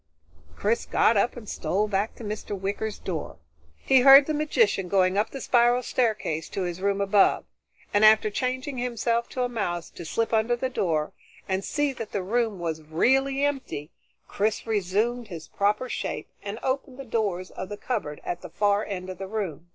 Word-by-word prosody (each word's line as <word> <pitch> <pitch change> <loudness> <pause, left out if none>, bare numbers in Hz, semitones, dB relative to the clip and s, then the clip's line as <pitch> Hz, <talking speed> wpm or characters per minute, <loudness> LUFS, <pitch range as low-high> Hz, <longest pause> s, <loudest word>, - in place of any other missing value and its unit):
Chris 225 +3 0
got 230 - +3
up 225 +5 +1
and 225 -3 -9
stole 205 +2 -1
back 205 +1 -1
to - - -10
Mr. 205 -1 -5
Wicker's 200 +2 -3
door. 165 -5 -5 0.4
He 265 - +4
heard 275 +2 +9
the 310 - -1
magician 305 - +1
going 185 0 +2
up 210 +2 +1
the 270 - -7
spiral 245 0 +3
staircase 215 -11 -1
to 195 - -3
his 175 0 -4
room 200 0 +1
above, 200 0 +3 0.5
and 205 +1 +3
after 215 0 +6
changing 255 +3 -2
himself 235 -1 -1
to 255 - -2
a - - +1
mouse 175 -8 -3
to - - -9
slip 225 +9 -1
under 225 +2 +2
the 260 +2 -2
door 160 -10 -1 0.3
and 190 0 -1
see 290 +2 0
that 230 -3 -7
the 200 - -1
room 225 +1 0
was 165 -2 -3
really 270 - +2
empty, 265 - -3 0.4
Chris 210 +1 -1
resumed 220 +3 0
his 170 -5 -9
proper 210 +5 0
shape - - -4
and 205 +1 -5
opened 265 -1 -2
the 275 - -8
doors 205 -6 -2
of 185 - -7
the 205 - -6
cupboard 205 - -3
at 175 - -4
the - - -9
far 205 0 +1
end 185 -3 -5
of 185 -1 -7
the 195 - -5
room. 185 -6 -4
215 Hz, 190 wpm, -26 LUFS, 190-245 Hz, 0.5 s, heard